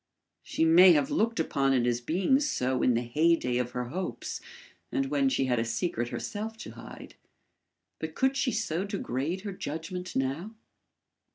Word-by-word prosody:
She 160 - 0
may 175 +3 +8
have 145 -3 +1
looked 230 +1 +1
upon 135 -4 +1
it 125 -2 +2
as 120 0 0
being 185 - +2
so 130 - 0
in 125 - +3
the 120 - 0
heyday 125 -1 +2
of 125 -1 -1
her 125 -1 -3
hopes 185 +6 -4 0.5
and 135 0 -1
when 140 -2 +3
she 135 - +1
had 125 -2 +1
a - - +1
secret 120 +1 -2
herself 220 - -5
to - - -8
hide, - - -11 0.9
but - - -5
could 265 0 +2
she 270 -1 +1
so 190 -6 -1
degrade 180 - -3
her 200 -1 -5
judgment 180 +3 -5
now? 145 +12 -2
160 Hz, 170 wpm, -29 LUFS, 125-190 Hz, 0.9 s, may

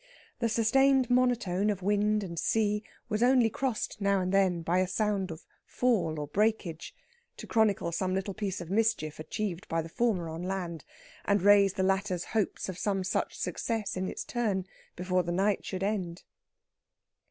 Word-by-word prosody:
The 230 -1 +1
sustained 260 +3 +3
monotone 235 -6 +2
of 195 -3 -2
wind 210 +1 +2
and 170 -3 -5
sea 210 -1 +1 0.3
was 215 0 -1
only 245 -2 +4
crossed 235 -3 -3
now 200 0 +2
and 185 0 -1
then 185 -3 +2
by 175 +3 +1
a 185 - +2
sound 200 -1 0
of 160 0 -9 0.2
fall 195 -11 0
or 150 - -3
breakage, 200 - -1 0.4
to - - -8
chronicle 210 -6 +1
some 185 +2 -1
little 190 +1 -2
piece 200 -2 -3
of 175 +1 -8
mischief 210 -8 0
achieved 190 +2 -4
by 165 0 -1
the 165 - -9
former 210 -5 0
on 160 +1 -6
land, 180 -4 -4 0.4
and 200 -2 +2
raise 200 -1 +6
the 190 - -1
latter's 190 -2 0
hopes 220 -3 -2
of 185 -2 -6
some 195 -2 0
such 185 - -2
success 225 -3 -2
in 185 0 -2
its - - -5
turn 210 -6 -1 0.3
before 180 +1 0
the 175 0 -3
night 195 +3 +1
should 190 -1 -4
end.... 190 -4 -2
195 Hz, 175 wpm, -29 LUFS, 180-215 Hz, 0.4 s, raise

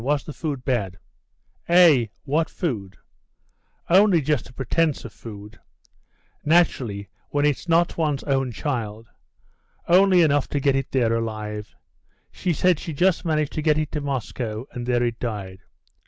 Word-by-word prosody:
Was 145 +2 0
the 150 - -8
food 140 -6 -4
bad?" 105 -8 -1 0.7
"Eh, 170 -9 +6 0.2
what 155 +3 0
food? 105 - -4 0.9
Only 190 0 +5
just 150 -4 -1
a - - -16
pretence 145 +4 0
of 115 - -9
food. 105 -1 -11 0.8
Naturally, 130 -11 +1 0.2
when 145 0 +1
it's 150 +4 -1
not 170 +1 +2
one's 150 -4 0
own 135 -3 0
child. 115 -4 -4 0.8
Only 185 0 +5
enough 145 -3 +2
to 145 - -2
get 140 0 +2
it 135 -1 -1
there 120 -4 +2
alive. 110 -2 -4 0.6
She 180 - -2
said 175 +1 +2
she 165 - -6
just 180 +4 +1
managed 155 -3 0
to 155 - -2
get 150 -1 +2
it 155 -1 -2
to 150 - -3
Moscow, 125 -4 -4
and 120 -1 -6
there 120 -1 +2
it 120 -1 -2
died. 100 -6 -5
140 Hz, 155 wpm, -23 LUFS, 115-160 Hz, 0.9 s, Eh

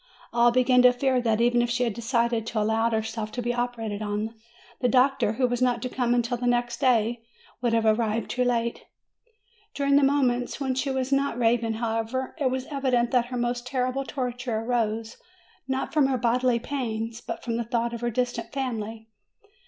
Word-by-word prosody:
All 240 0 +5
began 250 +1 +4
to 250 0 +7
fear 255 0 +1
that, 225 -2 +1
even 240 0 +3
if 240 - 0
she 245 +1 +1
had 235 -3 0
decided 235 0 0
to 235 - -1
allow 220 +2 +2
herself 220 -1 -3
to 245 - -3
be 240 +1 0
operated 235 -4 -3
on, 210 +1 -2 0.5
the 250 - +2
doctor, 255 -2 +3
who 255 +3 +1
was 245 0 -1
not 245 -2 +2
to 255 - -2
come 245 -1 0
until 240 0 0
the 245 +1 -2
next 240 -1 0
day, 235 -2 +2 0.4
would 240 -2 +1
have 225 -1 +2
arrived 220 0 +1
too 250 +1 +1
late. 235 -1 -1 0.9
During 280 0 +3
the - - +5
moments 255 -3 +1
when 265 -2 -1
she 265 +2 -1
was 265 0 -2
not 275 -3 +1
raving, 230 -1 +2
however, 225 +3 -2
it 270 -3 +2
was 260 0 -3
evident 255 -4 +1
that 245 -2 +2
her 250 0 -4
most 240 0 -2
terrible 255 +1 -1
torture 245 -4 -3
arose 225 -1 -1 0.5
not 265 0 -2
from 295 -3 +4
her 265 -1 0
bodily 245 +1 +2
pains, 230 -3 -4
but - - -6
from 230 -2 -2
the 235 - -1
thought 235 +1 -1
of 235 - -5
her 240 - 0
distant 245 +1 -2
family. 225 -5 -4
240 Hz, 195 wpm, -26 LUFS, 230-255 Hz, 0.9 s, to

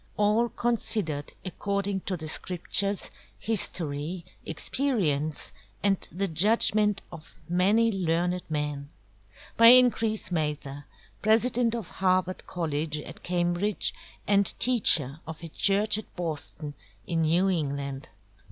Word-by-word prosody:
All 215 +3 +2
Considered 215 -12 -1
according 200 +1 -2
to 185 - -1
the 160 -1 -7
Scriptures, 185 +4 -1 0.3
History, 170 -5 -2 0.2
Experience, 160 - -1 0.3
and 195 -2 +3
the 195 +5 -1
Judgment 210 +3 +2
of 160 -2 -12
many 200 +6 +3
Learned 180 -1 0
MEN. 150 -2 -3 0.7
By 230 - +8
Increase 230 -5 +5
Mather, 150 -3 -3 0.4
President 230 +2 +2
of 225 -6 -5
Harvard 185 -1 0
Colledge 155 -3 -2
at - - -11
Cambridge, 175 +3 -1 0.3
and 200 -1 +3
Teacher 160 - +3
of 160 +1 -8
a 165 - -7
Church 205 +5 +1
at 215 - -13
Boston 155 -3 -5 0.3
in 165 -1 -1
New 170 +4 +2
England. 140 -6 -3
180 Hz, 110 wpm, -27 LUFS, 155-210 Hz, 0.7 s, By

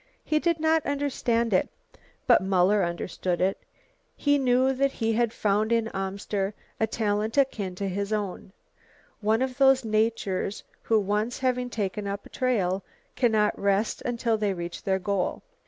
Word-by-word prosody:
He 310 - +2
did 335 0 +1
not 320 0 +2
understand 250 -5 0
it, 185 - +2 0.6
but - - +5
Muller 190 +1 +3
understood 175 +1 -2
it. 190 +2 +1 0.6
He 285 -1 +2
knew 260 0 +3
that 275 +1 +1
he 225 -1 0
had 235 0 +1
found 215 +1 0
in 230 -1 +2
Amster 195 +1 -3 0.2
a 220 - +2
talent 215 +1 -1
akin 210 -9 +1
to 195 +2 -3
his 200 +2 -3
own, 205 -3 -3 0.7
one 220 +3 +2
of 260 0 -4
those 265 -2 +5
natures 215 -3 0 0.2
who 225 -1 +2
once 210 +4 -1
having 250 -1 0
taken 205 -3 -3
up 200 0 -4
a - - -13
trail 200 -7 0 0.3
cannot 220 -4 +2
rest 200 +2 +1
until 235 -2 -1
they 205 -2 0
reach 170 0 -6
their 190 -1 +1
goal. 190 0 -2
215 Hz, 155 wpm, -26 LUFS, 195-245 Hz, 0.7 s, but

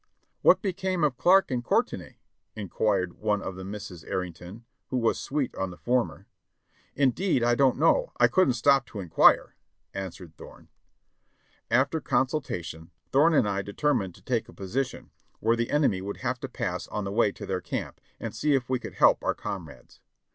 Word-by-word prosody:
"What - - +5
became 185 -2 -1
of 145 -4 +2
Clarke 190 -2 +5
and 125 -1 -1
Courtenay?" - - -1 0.4
inquired 100 -3 -1
one 105 -1 +1
of 95 -1 -6
the 95 - -8
Misses 95 -4 -8
Arrington, 90 +5 -6 0.2
who 130 - -2
was 115 -2 +1
sweet 140 -3 -2
on 95 - -3
the 90 - -10
former. 125 0 -1 0.7
"Indeed 135 +1 +2
I 120 0 +3
don't 130 0 +3
know, - - +3
I - - +7
couldn't 185 -10 +3
stop 135 +1 +3
to 105 - -8
inquire," 90 -4 +4 0.4
answered 90 -4 -7
Thorne. - - -14 1.0
After 140 +5 +2
consultation, 90 - -2 0.2
Thorne 155 +4 +4
and 110 - +4
I 100 -1 -1
determined 100 - -1
to - - -19
take 120 -3 -1
a - - -12
posi 120 +8 -2
tion - - -13 0.3
where 115 +2 +2
the 115 0 -2
enemy 140 -11 +2
would 100 +1 -5
have 125 0 -2
to 135 - -6
pass 100 -9 -3
on 105 - -4
the 100 - -4
way 105 -1 +3
to - - -8
their 95 -1 -2
camp, - - -5 0.2
and - - -5
see 150 -2 +2
if 125 -2 -1
we 130 - +1
could - - -9
help - - +4
our - - 0
comrades. - - -8
120 Hz, 180 wpm, -27 LUFS, 95-135 Hz, 1.0 s, I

